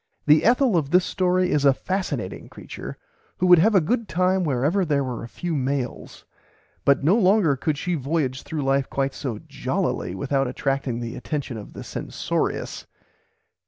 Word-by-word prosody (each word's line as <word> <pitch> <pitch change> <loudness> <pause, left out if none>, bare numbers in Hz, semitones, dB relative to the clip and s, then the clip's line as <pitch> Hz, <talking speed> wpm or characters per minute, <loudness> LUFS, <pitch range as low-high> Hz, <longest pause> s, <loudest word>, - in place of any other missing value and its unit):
The 150 +1 +5
Ethel 245 -1 +4
of 145 -4 0
this 180 +2 +4
story 185 0 +1
is 145 - +2
a 140 -2 +5
fascinating 155 - -3
creature - - -9 0.4
who 185 - 0
would 180 -2 +7
have 210 +5 +4
a - - +8
good 225 +7 -1
time 185 +2 +1
wherever 150 +6 +1
there 145 -4 +1
were 125 -3 -4
a - - -6
few 175 +7 -4
males, 135 -3 -3 0.6
but 140 0 +3
no 170 +8 +4
longer 195 -8 +4
could 145 +3 -1
she 180 +3 -2
voyage 140 -3 -1
through 155 -3 -4
life 135 0 +1
quite 135 0 -1
so 125 -6 -4
jollily 90 +1 -2
without 135 +5 0
attracting 130 -1 -2
the 115 -1 -5
attention 145 -5 -4
of 105 -2 -9
the - - -8
censorious. - - -3
150 Hz, 170 wpm, -24 LUFS, 135-180 Hz, 0.6 s, a